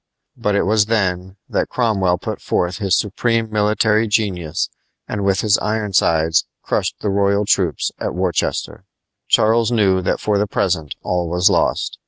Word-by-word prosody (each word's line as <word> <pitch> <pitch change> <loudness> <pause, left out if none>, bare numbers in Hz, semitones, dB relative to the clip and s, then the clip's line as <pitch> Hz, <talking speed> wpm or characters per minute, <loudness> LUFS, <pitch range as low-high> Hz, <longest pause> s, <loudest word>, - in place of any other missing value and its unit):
But 105 -1 -1
it - - +2
was 105 0 +2
then 95 -4 -1
that - - -1
Cromwell 100 -7 +1
put - - -6
forth 90 +2 -1
his 95 -4 +2
supreme 115 +2 -1
military 110 +1 +2
genius 90 -7 -1 0.4
and 105 -1 -3
with 100 -1 +1
his 105 -2 +3
Ironsides 95 -7 +1 0.2
crushed - - -1
the 105 - -1
royal 100 +1 +1
troops 95 -5 0
at - - -3
Worcester. 90 -3 -2 0.4
Charles 115 +2 +3
knew 100 -5 +2
that 90 - -1
for 105 -1 0
the 105 - 0
present 90 -7 -1
all 90 -2 -1
was 90 +4 +3
lost. - - 0
100 Hz, 155 wpm, -19 LUFS, 90-110 Hz, 0.4 s, his